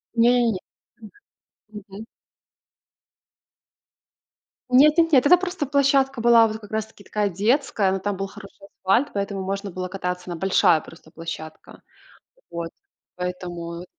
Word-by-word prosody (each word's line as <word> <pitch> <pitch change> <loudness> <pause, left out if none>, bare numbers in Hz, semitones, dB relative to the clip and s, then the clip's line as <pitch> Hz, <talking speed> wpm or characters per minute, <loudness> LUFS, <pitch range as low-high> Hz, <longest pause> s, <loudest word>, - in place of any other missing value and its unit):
Не-не-не. 235 -3 +3 1.1
М. 210 -1 -9
Мгм. 200 +3 -9 2.7
Нет-нет-нет. 300 +1 +5
Это 360 +5 +7
просто 360 -3 -3
площадка 275 -2 +2
была, 230 -1 +6
вот 220 0 -5
как 210 -2 -13
раз 220 0 -1
таки 220 -2 -19
такая 205 +1 -1
детская, 210 - +1
но 190 - 0
там 205 +1 -2
был 195 +1 -3
хороший 195 0 -14
асфальт, 200 +9 +1
поэтому 200 -1 -3
можно 195 +1 -4
было 185 +1 -5
кататься. 180 -1 -4
Она 175 - -4
большая 185 -2 +3
просто 165 0 -15
площадка. 160 -1 -9 0.7
Вот 170 -1 -5 0.5
поэтому, 175 -1 -6
205 Hz, 125 wpm, -23 LUFS, 185-245 Hz, 2.7 s, Это